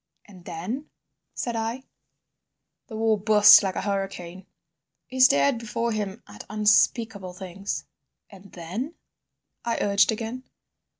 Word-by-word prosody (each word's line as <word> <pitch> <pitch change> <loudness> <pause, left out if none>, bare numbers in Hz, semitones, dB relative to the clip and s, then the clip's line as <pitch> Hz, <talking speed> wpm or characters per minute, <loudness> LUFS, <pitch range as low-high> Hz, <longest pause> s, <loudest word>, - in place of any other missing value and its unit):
"And 185 -4 -16
then?" 220 - -6 0.5
said 240 -1 -3
I. 225 +3 -3 1.0
"The 220 - -9
war 220 -1 +1
burst 210 0 +8
like 190 -2 -2
a - - -3
hurricane." 195 -2 -4 0.6
He 260 - -8
stared 140 - +5
before 230 +1 -3
him 210 0 -4
at 105 0 -11
unspeakable 210 -2 +1
things. 190 +2 -6 0.4
"And 195 -1 -16
then?" 195 - -6 0.7
I 235 - -1
urged 200 +2 +3
again. 230 +4 -5
210 Hz, 120 wpm, -25 LUFS, 190-230 Hz, 1.0 s, burst